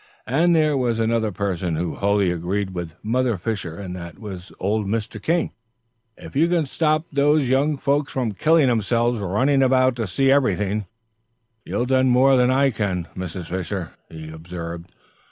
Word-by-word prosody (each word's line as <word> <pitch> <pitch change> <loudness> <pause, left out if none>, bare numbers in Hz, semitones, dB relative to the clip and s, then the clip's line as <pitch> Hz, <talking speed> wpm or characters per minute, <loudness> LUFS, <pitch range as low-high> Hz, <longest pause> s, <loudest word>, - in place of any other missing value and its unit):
And 165 +7 +3
there 155 -2 +3
was 120 -4 0
another 115 -1 +1
person 90 -3 -2
who 85 +1 -2
wholly 100 -2 +1
agreed 95 +3 -2
with 85 -2 -6
Mother 120 0 +1
Fisher, 90 -4 -4
and 95 -3 -6
that 85 -2 -8
was 95 -4 -9
old 105 +1 0
Mr. 110 0 -3
King. 165 +5 0 0.7
"If - - -12
you 160 +4 +4
can 170 -3 +1
stop 155 +3 0
those 145 0 +3
young 140 +3 +2
folks 140 +1 0
from 125 -4 -1
killing 155 +7 +3
themselves 120 0 +1
running 130 +9 +2
about 130 -1 +3
to 115 -3 -2
see 135 +10 +2
everything, 105 -7 +1 0.8
you'll 120 - -2
do 130 0 +3
more 130 +1 +4
than 125 -1 +4
I 135 +1 +3
can, 95 -6 -2
Mrs. 90 -1 -5
Fisher," 90 0 -4 0.2
he 80 -1 -9
observed. 85 +1 -7
110 Hz, 165 wpm, -22 LUFS, 95-135 Hz, 0.8 s, you